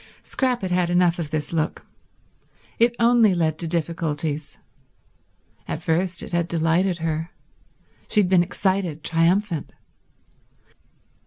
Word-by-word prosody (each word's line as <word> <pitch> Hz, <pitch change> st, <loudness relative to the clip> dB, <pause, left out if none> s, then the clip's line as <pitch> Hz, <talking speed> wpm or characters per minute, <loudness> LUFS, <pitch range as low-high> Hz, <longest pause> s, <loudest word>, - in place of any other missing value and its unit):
Scrap 250 Hz, -4 st, -1 dB
had 185 Hz, -, -2 dB
had 180 Hz, -1 st, +1 dB
enough 175 Hz, -1 st, +2 dB
of 160 Hz, -3 st, -3 dB
this 155 Hz, +1 st, -3 dB
look. 160 Hz, -2 st, -2 dB, 0.9 s
It 235 Hz, +1 st, +3 dB
only 230 Hz, -4 st, +4 dB
led 160 Hz, -2 st, 0 dB
to 170 Hz, -, -3 dB
difficulties. 160 Hz, -2 st, -3 dB, 1.1 s
At -, -, -5 dB
first 170 Hz, +1 st, 0 dB
it -, -, -8 dB
had 170 Hz, -1 st, 0 dB
delighted 170 Hz, +2 st, +1 dB
her. 160 Hz, +1 st, -2 dB, 0.8 s
She 210 Hz, -, +4 dB
had 190 Hz, -, +1 dB
been 185 Hz, -1 st, +4 dB
excited, 180 Hz, -3 st, -1 dB
triumphant. 170 Hz, +1 st, +1 dB
170 Hz, 125 wpm, -23 LUFS, 160-190 Hz, 1.1 s, only